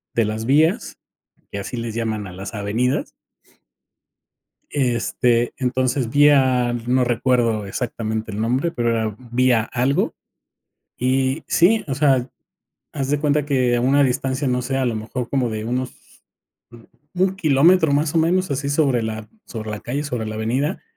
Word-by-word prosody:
de 115 - +3
las 110 +1 -3
vías, 160 - +2 0.6
que 100 - -4
así 100 +5 -5
les 115 -1 -4
llaman 110 -3 -2
a - - -9
las 95 +2 -7
avenidas. 110 +5 -1 1.6
Este, 120 -2 +1
entonces, 130 -1 0
vía 130 -4 +4
no 125 +1 +2
recuerdo 120 -3 +1
exactamente 110 0 -4
el 105 - -5
nombre, 125 +9 0
pero 120 -5 0
era 110 -2 -1 0.2
vía 125 -2 +3
algo 130 +5 0 0.8
y 130 +3 0
sí, 210 +6 +3
o 135 - -2
sea, 135 -3 +2 0.7
haz 135 -2 -3
de 145 0 +1
cuenta 150 -1 +1
que 130 -4 +1
a - - 0
una 140 +3 +4
distancia, 130 +1 0
no 125 0 0
sé, 135 +2 -2
a 130 - +1
lo 120 - 0
mejor 115 +3 -4
como 130 -4 0
de 110 -1 -4
unos 125 +1 -2 1.2
1 190 +1 +1
kilómetro, 160 0 +4
más 145 +2 +1
o - - +4
menos, 180 +3 +1
así 140 0 -2
sobre 140 -5 +2
la 110 -1 -5 0.2
sobre 110 -2 -6
la 105 -1 -5
calle, 140 +5 -3
sobre 125 -6 -3
la 110 0 -5
avenida, 130 - -1
125 Hz, 155 wpm, -21 LUFS, 115-140 Hz, 1.6 s, vía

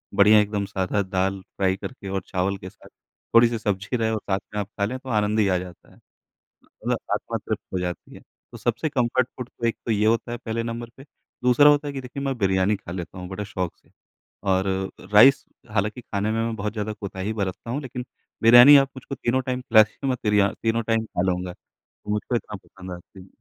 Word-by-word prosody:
बढ़िया 105 +1 +7
एकदम 105 -1 -2
सादा 95 +1 -1
दाल 95 0 -1
फ़्राई 95 0 -1
करके 100 -2 -8
और 95 0 -2
चावल 95 +1 -1
के 95 -1 -9
साथ 100 - -18 0.5
थोड़ी-सी 115 0 +6
सब्ज़ी 105 +2 -2
रहे 110 -1 0
और 110 - -1
साथ 95 0 +1
में 105 - -2
आप 100 - -5
खा 100 - +3
लें, 125 +5 -3
तो 130 - -10
आनंद 105 -1 +1
ही 105 - +3
आ 95 -1 +2
जाता 90 -1 -10
है, - - -20 0.7
मतलब - - -3 0.2
आत्मा - - -2
तृप्त - - -4
हो 95 - 0
जाती 90 -1 -5
है। - - -12 0.3
तो - - -9
सबसे 120 +7 -1
कंफ़र्ट 125 -2 +1
फ़ूड 125 -1 -6
तो 120 - -6
एक 115 - -1
तो 115 - 0
ये 105 0 +2
होता 115 +1 +1
है 120 - -3
पहले 115 -1 -3
नंबर 115 0 -5
पे, 135 - -12 0.4
दूसरा 125 +4 +6
होता 145 0 +3
है 145 - -4
कि 135 - -4
देखिए 130 +2 -7
मैं 135 -2 -1
बिरयानी 95 0 +2
खा 95 -4 -10
लेता 90 0 -6
हूँ 90 - -7
बड़े 105 +2 -5
शौक 90 -4 -4
से। - - -31 0.5
और 95 0 +2 0.3
अ, - - -12
राइस 130 +7 +7 0.3
हालाँकि 105 +4 -1
खाने 105 -1 -2
में 115 +1 0
मैं 115 0 -2
बहुत 105 0 -3
ज़्यादा 105 -1 -3
कोताही 100 0 -5
बरतता 100 +2 -4
हूँ, 140 +4 -2
लेकिन 125 -2 -6 0.4
बिरयानी 120 +5 +10
आप 135 -1 +3
मुझको 135 +2 -7
तीनों 125 +1 0
टाइम 130 -1 -3
खिला 110 -3 +6
दीजिए, 120 +6 -5
मैं 130 - 0
तिरियाँ 105 -2 +3
तीनों 115 0 +1
टाइम 115 -1 +1
खा 90 - -3
लूँगा, 90 0 -3 0.6
वो - - -1
मुझको 105 +3 -2
इतना 110 -2 -3
पसंद 95 -1 -11
आती 90 +2 -11
है। - - -18
105 Hz, 230 wpm, -24 LUFS, 95-120 Hz, 0.7 s, बिरयानी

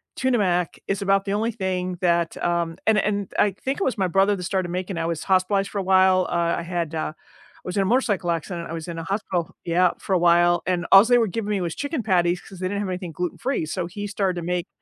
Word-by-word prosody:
Tuna 260 -2 +1
Mac 180 -4 0
is 195 0 -1
about 195 0 +2
the 200 - -1
only 220 +3 0
thing 185 -4 -3
that, 170 -2 +1
um 170 -1 0
and 220 -1 +5
and 200 -1 -1
I 205 - +5
think 265 +8 -4
it - - +3
was 255 - 0
my 190 -2 +1
brother 195 +3 +3
that 180 - -6
started 185 0 -1
making 180 +1 -4
it. - - -1
I - - -1
was 165 -2 -3
hospitalized 195 +1 +1
for 205 - -2
a - - -2
while, 185 -1 +4
uh, 170 -1 +1
I - - -3
had, 170 -2 -3
uh 155 -1 -2
I - - -26
was 180 +2 -4
in - - +4
a - - -1
motorcycle 205 -5 +1
accident, 170 +1 -4
I - - -5
was 165 0 -6
in 170 -1 -5
a - - -5
hospital 185 -3 -2
Yeah, 175 +1 +3
for 195 - -3
a 185 - +3
while, 175 0 +4
and 180 -2 0
all 195 +3 +9
they 245 - +6
were 230 - +3
giving 210 +2 -4
me 200 -2 0
was 170 -2 -2
chicken 285 -3 -3
patties 180 -3 +2
'cause 190 - -13
they 185 - -1
didn't 200 +2 -2
have 200 - -3
anything 180 -2 -4
gluten-free, 180 - -2
so 170 +2 -3
he 205 +3 -6
started 195 -2 -1
to - - -7
make 180 0 -2
185 Hz, 265 wpm, -23 LUFS, 175-200 Hz, -, all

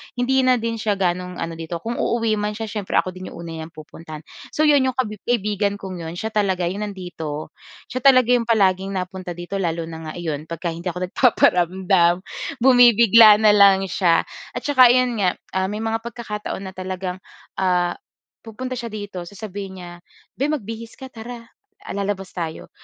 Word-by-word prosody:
hindi 255 +2 +1
na 255 - +5
din 230 -1 -3
siya 210 -2 0
gaanong 180 -1 -1
ano 165 - -4
dito, 165 +1 -5
kung 235 +1 -3
uuwi 225 -2 0
man 210 0 -2
siya 220 -1 -5
siyempre 205 -3 -4
ako 185 - +2
din 185 0 -9
'yong - - -10
una 165 - -7
niyang 160 +1 -8
pupuntahan. 155 0 -10 0.3
So 305 - +2
'yon 295 -2 +5
'yong 255 - -2
kabi 215 -6 -2
kaibigan 205 -3 0
kong 190 -3 -7
'yon 165 0 -6
siya 220 +4 -4
talaga 195 -4 0
'yong 210 +2 -4
nandito, 160 -6 -6 0.4
siya 255 - -2
talaga 255 -2 +5
'yong 240 -2 +2
palaging 195 -3 +2
napunta 180 -1 -5
dito 175 +3 -5
lalo 170 -2 -1
na 160 -1 -8
nga 155 - -6
iyon 155 -3 -4
'pagka 170 0 -4
hindi 170 +3 -7
ako 180 +1 -3
nagpaparamdam, 180 -5 +3 0.4
bumibigla 235 -4 +8
na 215 - +7
lang 200 -2 +6
siya 170 -3 +3 0.3
at - - -3
saka 260 -4 +6
'yon 245 -2 +2
nga 185 -2 +2
ah, 190 0 -1
may 210 +3 -4
mga 225 0 0
pagkakataon 210 -4 -5
na 190 -1 -7
talagang 185 0 -4 0.4
ah, 180 -2 +1 0.5
pupunta 255 +3 -5
siya 235 - -5
dito, 205 -4 -6
sasabihin 195 -1 -8
niya, 175 - -9 0.5
"Be, 275 - 0
magbihis 230 -6 -4
ka 265 -1 -10
tara, 235 0 -9 0.4
ah, - - -7
lalabas 195 -1 -3
tayo." 165 -2 -5
195 Hz, 185 wpm, -21 LUFS, 180-230 Hz, 0.5 s, bumibigla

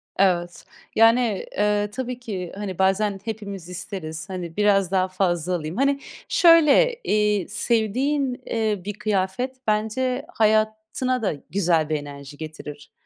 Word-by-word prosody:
Evet, 175 -2 +1 0.3
yani, 225 -2 +4
eee, 210 0 +1
tabii 250 +1 -4
ki, 190 -8 -5
hani, 195 -3 -5
bazen 195 +1 +2
hepimiz 200 -5 -6
isteriz. 175 -2 -6
Hani, 175 -3 -6
biraz 200 -3 +3
daha 185 -1 +2
fazla 180 -2 0
alayım. 160 +3 -5
Hani, 275 +1 +2 0.3
şöyle, 335 - +6
eee, 210 -3 +1
sevdiğin, 250 +5 0
eee, 215 -4 -1
bir 205 - -3
kıyafet 215 +4 -1
bence 250 +5 0
hayatına 220 +3 +1
da 195 - 0 0.2
güzel 165 -4 +1
bir 155 - +1
enerji 145 -1 -8
getirir. 150 -2 -9
205 Hz, 130 wpm, -23 LUFS, 180-225 Hz, 0.3 s, şöyle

